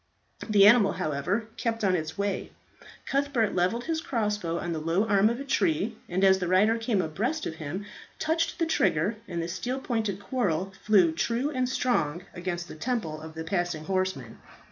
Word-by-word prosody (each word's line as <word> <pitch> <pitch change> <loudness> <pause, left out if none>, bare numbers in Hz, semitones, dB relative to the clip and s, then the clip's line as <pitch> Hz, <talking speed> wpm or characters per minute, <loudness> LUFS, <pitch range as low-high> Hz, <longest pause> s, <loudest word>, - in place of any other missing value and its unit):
The 205 -2 +6
animal, 210 -2 +6
however, 155 +9 -1
kept 230 -1 -2
on 190 -2 +3
its 160 -1 -4
way. 200 -1 -2 0.6
Cuthbert 275 -6 +1
levelled 185 +7 +1
his 320 +1 -2
crossbow 210 - -1
on 170 0 -3
the 160 - -2
low 165 +7 +1
arm 200 0 +4
of 235 +2 -2
a - - -4
tree, 205 - +1
and 185 +2 0
as 190 -1 +6
the 180 - -2
rider 210 +6 +3
came 225 -5 +1
abreast 225 - -2
of 160 - -5
him 165 +6 -5 0.3
touched 330 +1 0
the 335 - +1
trigger, 195 - +1
and 170 -1 -3
the - - -3
steel 245 +9 -3
pointed 220 -7 -2
quarrel 195 -5 -1
flew 195 -6 +5
true 235 - -1
and 255 -3 0
strong 180 - 0
against 175 -1 -4
the - - -9
temple 160 -5 -3
of 160 0 -10
the 160 - -4
passing 175 -2 -2
horseman. 185 -10 -2
195 Hz, 185 wpm, -27 LUFS, 170-235 Hz, 0.6 s, The